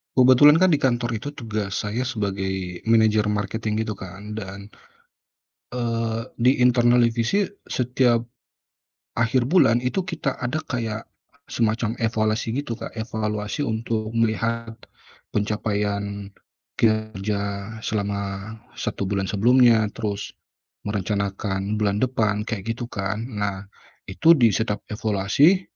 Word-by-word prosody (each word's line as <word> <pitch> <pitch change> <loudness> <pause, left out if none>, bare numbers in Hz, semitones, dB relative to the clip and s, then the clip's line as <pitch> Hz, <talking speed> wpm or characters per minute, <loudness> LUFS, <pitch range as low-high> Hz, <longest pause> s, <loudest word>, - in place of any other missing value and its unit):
Kebetulan 140 +6 +7
kan 185 - +6
di 150 - +4
kantor 120 -2 +1
itu 140 - -6
tugas 110 -5 -3
saya 115 +4 -2
sebagai, 95 -5 -3
manajer 110 -2 +4
marketing 105 +1 -1
gitu 105 -3 -5
kan, 100 +4 -8
dan 100 +1 -8 1.0
eee, 115 -2 -1 0.2
di 125 +3 +5
internal 120 0 +5
divisi 115 - +2 0.2
setiap 125 -2 +2 0.9
akhir 120 +2 +2
bulan 130 -8 +4
itu 125 +10 -1
kita 170 -6 -3
ada 125 +6 -1
kayak 115 -4 -3 0.4
semacam 115 0 0
evaluasi 110 0 0
gitu 120 -5 -3
Kak, - - -7
evaluasi 105 +2 -2
untuk 110 -2 -2
melihat 115 0 0 0.6
pencapaian 100 -1 -2 0.4
kerja 105 -1 -1
selama 100 -2 -2 0.5
1 100 - -3
bulan 95 -1 -1
sebelumnya. 115 +1 +5
Terus 105 -3 -4 0.5
merencanakan 100 0 -2
bulan 105 +1 0
depan, 110 -5 +1
kayak 115 0 -3
gitu 120 0 -7
kan. 105 +1 -3 0.2
Nah 100 -1 -3 0.4
itu 165 - +6
di 120 -6 +5
setiap 105 +1 -1
evaluasi, 110 - +3
110 Hz, 115 wpm, -23 LUFS, 100-120 Hz, 1.0 s, Kebetulan